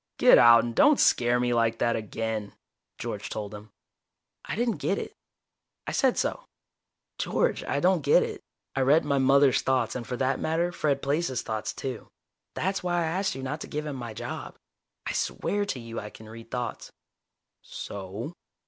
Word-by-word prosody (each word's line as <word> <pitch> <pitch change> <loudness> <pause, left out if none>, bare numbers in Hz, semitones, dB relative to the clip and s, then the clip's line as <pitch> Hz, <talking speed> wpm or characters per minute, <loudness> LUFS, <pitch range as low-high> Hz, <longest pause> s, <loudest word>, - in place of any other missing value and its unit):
"Get - - +7
out, 115 0 +8
and 120 - -3
don't 295 - +5
scare 120 0 +4
me 120 0 +1
like 115 -1 +2
that 115 0 +1
again." 110 -1 -4 0.4
George - - -5
told 105 -1 -5
him. 105 +1 -10 0.7
I - - -4
didn't 235 0 0
get - - 0
it. - - -5 0.7
I - - -3
said - - +2
so: - - -1 0.7
"George, - - 0
I 140 - 0
don't 180 +1 +3
get 145 +1 +5
it. - - -5 0.3
I 135 - +1
read 145 +4 +4
my 140 -1 +1
mother's 135 0 +5
thoughts, 130 -1 +1
and 120 -3 -5
for 125 - -3
that 130 +1 0
matter, 165 +2 0
Fred 145 -5 0
Plaice's 140 -2 0
thoughts, 110 -1 -3
too. 130 -4 -6 0.5
That's 190 +1 -1
why 175 -1 0
I 160 - -1
asked 190 +1 -1
you 135 - -6
not 150 +4 -4
to - - -6
give 150 +1 -4
him 150 -2 -4
my 120 -4 -6
job. - - -6 0.5
I - - -2
swear 205 0 -1
to 140 - -3
you 115 -1 -6
I 105 - -7
can 110 - -13
read 115 +1 -11
thoughts." 120 -1 -4 0.7
"So?" 100 - -7
130 Hz, 185 wpm, -27 LUFS, 115-150 Hz, 0.7 s, out